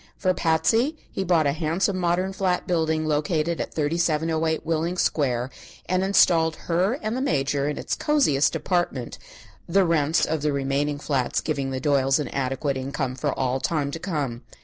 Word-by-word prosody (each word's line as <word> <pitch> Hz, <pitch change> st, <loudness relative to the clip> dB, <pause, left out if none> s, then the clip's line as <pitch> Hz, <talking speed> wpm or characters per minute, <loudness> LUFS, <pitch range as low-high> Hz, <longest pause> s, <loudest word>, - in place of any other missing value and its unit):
For 185 Hz, -1 st, +1 dB
Patsy 225 Hz, -, +1 dB
he 195 Hz, -, -2 dB
bought 170 Hz, -4 st, +2 dB
a 140 Hz, -, +3 dB
handsome 165 Hz, +6 st, 0 dB
modern 180 Hz, +2 st, 0 dB
flat 185 Hz, -2 st, 0 dB
building 160 Hz, -2 st, 0 dB
located 155 Hz, +2 st, 0 dB
at -, -, -6 dB
3708 160 Hz, 0 st, 0 dB
Willing 165 Hz, +2 st, -1 dB
Square, 130 Hz, -6 st, 0 dB, 0.3 s
and 185 Hz, +1 st, 0 dB
installed 165 Hz, -4 st, +4 dB
her 180 Hz, +8 st, 0 dB
and 215 Hz, +2 st, -1 dB
the 260 Hz, -, -2 dB
Major 140 Hz, -, 0 dB
in 150 Hz, -, -4 dB
its -, -, -3 dB
cosiest 245 Hz, -, +2 dB
apartment, 160 Hz, -6 st, -2 dB, 0.5 s
the 195 Hz, +2 st, +4 dB
rents 160 Hz, -2 st, +2 dB
of 160 Hz, -1 st, -2 dB
the 150 Hz, 0 st, +1 dB
remaining 140 Hz, +1 st, -1 dB
flats 135 Hz, -4 st, -1 dB
giving 140 Hz, -4 st, -2 dB
the 130 Hz, -1 st, -3 dB
Doyles 135 Hz, -2 st, +2 dB
an 145 Hz, -5 st, -3 dB
adequate 135 Hz, +1 st, -2 dB
income 135 Hz, 0 st, -3 dB
for 140 Hz, +2 st, -2 dB
all 130 Hz, 0 st, 0 dB
time 145 Hz, -1 st, -1 dB
to 165 Hz, -, -5 dB
come. 145 Hz, -10 st, -3 dB
155 Hz, 170 wpm, -24 LUFS, 140-175 Hz, 0.5 s, installed